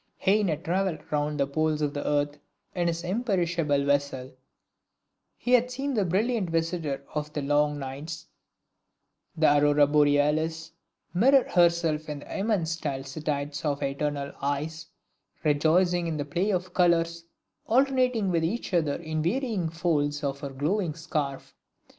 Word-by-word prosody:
Heine 205 +1 +2
had 155 0 -2
traveled 180 -3 0
round 150 0 -1
the 140 - +3
poles 155 +2 0
of 145 -1 -1
the 145 - -3
earth 145 0 0 0.3
in 175 -2 0
this 170 0 -2
imperishable 175 - 0
vessel; 140 -2 0 1.1
he 245 - -3
had 250 0 +5
seen 270 +2 -3
the 215 -5 +2
brilliant 205 +2 0
visitor 165 -4 -2
of 150 0 -3
the 145 - -3
long 145 +1 +2
nights, 145 +3 -6 1.1
the 155 -2 +5
aurora 145 0 +5
borealis, 150 +3 +2 0.4
mirror 260 +8 +5
herself 170 -3 +2
in 150 - -4
the - - -8
immense 195 -6 0
stalactites 145 0 -3
of 145 -2 -1
eternal 140 0 -2
ice, 150 +3 -3 0.6
rejoicing 170 +4 +2
in 160 -2 -2
the 145 - -2
play 175 +8 -1
of 180 -2 -1
colors 170 -1 +2 0.4
alternating 255 -5 +2
with 165 -2 +1
each 200 +4 -2
other 155 -5 +2
in 160 -2 -3
the 170 +4 +1
varying 225 -11 -1
folds 150 -4 -1
of 140 -1 -2
her 140 -1 -5
glowing 155 +5 -1
scarf. 150 -5 -4
160 Hz, 145 wpm, -27 LUFS, 145-180 Hz, 1.1 s, had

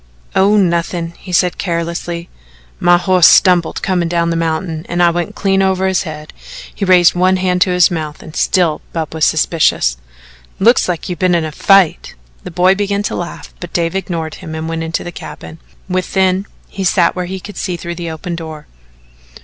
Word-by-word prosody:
"Oh, 200 +2 +4
nothin'," 170 -2 0
he 185 - -10
said 180 0 +1
carelessly. 170 -1 -3 0.5
"My 175 0 +5
hoss 180 -2 +4
stumbled 175 -3 +4
comin' 180 -3 0
down 170 0 0
the - - -1
mountain 160 0 -2
an' 175 - -2
I 175 -1 +5
went 175 0 -3
clean 195 -1 +1
over 190 0 +1
his 190 -1 +1
head." 155 -2 -8 0.4
He - - -5
raised 180 -2 +5
one 185 +1 +2
hand 180 -1 0
to 185 - +4
his 180 -1 +4
mouth 155 -3 -5
and 160 - -12
still 175 -5 +1
Bub 160 -2 -3
was 160 -1 +1
suspicious. 155 - +1 0.6
"Looks 230 0 +3
like 175 -2 -3
you 180 - -3
been 180 0 +1
in 165 -2 0
a 155 - -5
fight." 195 +1 +2 0.3
The - - -7
boy 180 +3 +3
began 200 +1 -1
to - - -3
laugh, 175 -1 -7
but 175 - -9
Dave 165 -1 0
ignored 165 -5 -3
him 160 - -7
and 160 0 -4
went 165 0 -3
on 165 - -3
into 160 - -3
the 175 - -6
cabin. 160 -1 -10 0.3
Within, 185 +1 0 0.2
he 195 - -6
sat 175 -2 +2
where 180 -1 -3
he 190 +1 -5
could 205 +2 -10
see 180 -3 -3
through 170 +1 -6
the 170 -1 -5
open 170 +2 -5
door. 160 -2 -8
175 Hz, 200 wpm, -15 LUFS, 165-185 Hz, 0.6 s, My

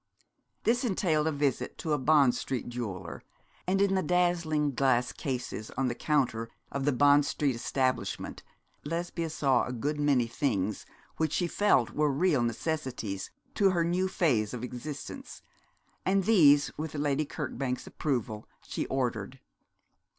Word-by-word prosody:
This 240 +3 +2
entailed 170 -9 +1
a - - +2
visit 145 -2 -1
to 155 - -2
a 150 - +1
Bond 140 -2 +5
Street 130 -3 -3
jeweller, 100 -8 -5 0.5
and 190 +1 +2
in 200 -1 +3
the 190 - +2
dazzling 170 -5 +1
glass 125 -1 +2
cases 125 -7 -4
on 135 -1 +1
the - - -1
counter 120 -5 0 0.2
of 140 -1 -2
the 145 - +3
Bond 145 +2 +5
Street 140 -2 0
establishment 130 +2 -2 0.4
Lesbia 165 +1 -3
saw 135 -5 +2
a - - -4
good 145 +5 -2
many 140 -5 +3
things 110 -6 -2 0.3
which 160 -2 0
she 180 - +1
felt 170 - +2
were 150 -1 +1
real 150 -1 +2
necessities 120 - -3 0.2
to 200 -2 +4
her 175 -2 +2
new 180 +3 +1
phase 125 - +1
of 120 - -6
existence, 130 +4 -7 0.6
and 195 +1 +2
these, 150 -9 +5
with 155 0 -4
Lady 145 0 0
Kirkbank's 130 -3 -3
approval, 115 -7 -3 0.2
she - - -3
ordered. 125 -2 -2
145 Hz, 145 wpm, -29 LUFS, 125-160 Hz, 0.6 s, Bond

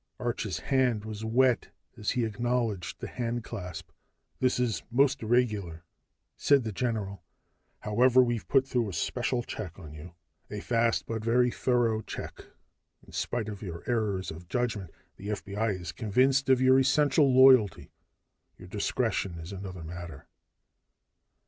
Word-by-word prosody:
Arch's - - -2
hand 125 -6 +1
was 110 0 -6
wet 125 +2 +2 0.3
as 105 -3 -3
he 125 -2 +1
acknowledged 115 -4 -2
the - - -5
handclasp. 115 -6 -5 0.5
"This 130 -1 +1
is 120 -4 0
most 135 +3 +2
irregular," 105 -8 0 0.5
said 140 -3 +3
the 110 - -3
general. 100 -4 -3 0.6
"However, 125 +4 +4
we've 120 -2 -2
put 135 -1 +3
through 120 -5 0
a - - -7
special 120 +7 -1
check 95 -7 -7
on 80 -5 -10
you. 80 +3 -10 0.4
A 105 - -5
fast 115 +1 +1
but 110 -1 -4
very 120 +2 +3
thorough 120 -4 +1
check. - - -8 0.6
In - - -16
spite 120 -3 -2
of 105 -2 -6
your 85 -4 -7
errors 105 -6 -1
of 80 +2 -10
judgment, 110 -7 -2 0.3
the 100 - -9
FBI 105 -1 -2
is 90 0 -6
convinced 130 +6 +2
of 130 -1 +5
your 130 0 +6
essential 140 +1 +3
loyalty. 130 -6 +5 0.7
Your - - -12
discretion 90 -4 -1
is 80 +3 -8
another 95 -3 -7
matter." 85 -3 -8
115 Hz, 140 wpm, -29 LUFS, 100-125 Hz, 0.7 s, your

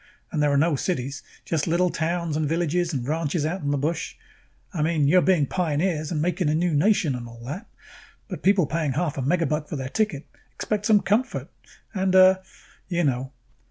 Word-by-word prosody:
And 150 - -1
there 145 -1 +3
are 140 - +3
no 160 +2 +3
cities, 140 -3 -2 0.2
just 155 -4 -1
little 175 +2 +2
towns 170 -1 -1
and 155 -2 0
villages 170 +1 0
and 130 -5 -3
ranches 155 0 -1
out 175 +5 -2
in 145 - -2
the 145 - +1
bush. 155 +4 -2 0.6
I - - -2
mean 155 -2 +2
you 180 +5 +6
are - - +2
being 175 -6 +3
pioneers 160 0 -1
and 160 - -1
making 175 0 0
a 150 - +2
new 170 +1 +1
nation 165 -1 +3
and 120 -1 -5
all 115 0 -12
that, 180 - -6 0.6
but - - -6
people 195 -3 +4
paying 155 -3 -1
half 150 -1 -1
a - - -1
megabuck 150 +1 0
for - - -4
their 130 -2 -4
ticket 205 -6 -1 0.3
expect 210 -1 -2
some 210 -2 +5
comfort 210 +7 0 0.4
and, 190 -2 0
uh, 185 0 +7 0.5
you 175 -1 0
know." 130 -2 -1
160 Hz, 200 wpm, -24 LUFS, 145-180 Hz, 0.6 s, uh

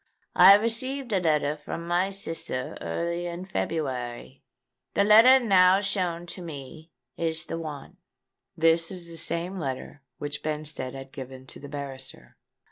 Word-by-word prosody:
I 190 +2 +10
received 240 +3 -1
a 195 - +3
letter 150 -3 +1
from 155 +2 -7
my 175 +3 +1
sister 165 -9 -4
early 170 - -2
in 175 +2 -6
February. 130 - -4 0.5
The 200 - +4
letter 225 +6 +8
now 190 -5 +5
shown 180 -4 -1
me 160 -1 -9 0.3
is 165 -1 0
the 165 - -4
one." 150 -4 -8 0.6
(This 165 +1 +3
was 180 -3 -6
the 165 - -9
same 170 +3 -2
letter 135 -1 -5 0.2
which 145 +1 -5
Benstead 150 -4 -3
had 135 0 -9
given 130 -1 -9
to - - -12
the 140 - -10
barrister.) 135 -2 -7
165 Hz, 140 wpm, -27 LUFS, 140-185 Hz, 0.6 s, I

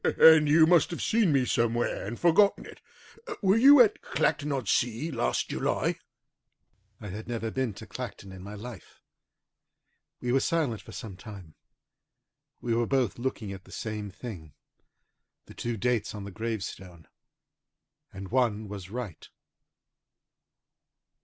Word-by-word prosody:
"And 160 -2 +8
you 160 +2 +7
must 170 0 +4
have 170 - -5
seen 220 -6 +2
me 135 -3 +3
somewhere 120 0 0
and 110 - -4
have - - -15
forgotten 175 +4 +4
it! - - -13 0.6
Were 195 +1 +4
you 275 +5 +8
at 215 -3 +3
Clacton 150 0 0
on 135 -4 -2
Sea 120 +9 0
last 120 -3 -1
July?" - - -1 1.0
I 105 - -8
had 105 +4 -7
never 115 -2 -3
been 130 -5 -2
to - - -10
Clacton 100 - -8
in 95 -1 -10
my 100 +3 -8
life. 110 0 -10 1.2
We 125 - -2
were 135 - +4
silent 135 - 0
for - - -13
some 100 -5 -8
time. 95 -7 -11 1.1
We 120 - -1
were 115 0 +1
both 130 -5 0
looking 120 -5 -3
at 95 -1 -11
the - - -16
same 105 -2 -5
thing, 95 - -9 0.9
the - - -13
two 120 -1 -4
dates 115 -1 -1
on 100 - -6
the 100 - -8
gravestone, 95 -6 -6 1.0
and 95 -1 -9
one 115 -4 +1
was 100 -2 -8
right. 110 -6 -7
115 Hz, 145 wpm, -28 LUFS, 100-135 Hz, 1.2 s, And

